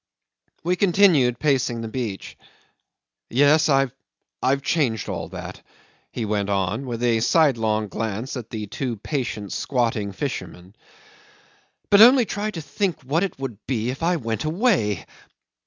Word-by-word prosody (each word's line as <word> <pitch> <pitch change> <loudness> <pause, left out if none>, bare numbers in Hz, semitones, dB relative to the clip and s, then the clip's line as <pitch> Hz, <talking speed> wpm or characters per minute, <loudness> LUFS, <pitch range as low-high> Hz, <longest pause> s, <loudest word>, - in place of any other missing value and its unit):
'We 180 +2 0
continued 175 -11 +4
pacing 130 -5 0
the 115 - -4
beach. 110 -4 -5 0.9
"Yes, 145 +4 +4
I've 135 -2 +2 0.7
changed 125 - 0
all - - -4
that," - - -8 0.5
he 115 - -3
went 105 -1 -1
on, 100 +6 -1
with 120 -1 -4
a 115 -2 +3
sidelong 115 -6 +2
glance 110 +5 -4
at 120 -4 -7
the 110 -2 -5
two 120 +4 -4
patient 110 -4 -4
squatting 115 -6 -1
fishermen; 95 - -6 1.2
"but 200 0 +7
only 250 +1 +8
try 210 +1 -3
to 175 -6 -6
think 170 +4 -2
what 145 +6 0
it 195 - -2
would 130 -6 -6
be 120 -2 -1
if 135 - -8
I 175 +2 +2
went 115 -6 -3
away. 155 - +1
125 Hz, 140 wpm, -23 LUFS, 110-155 Hz, 1.2 s, only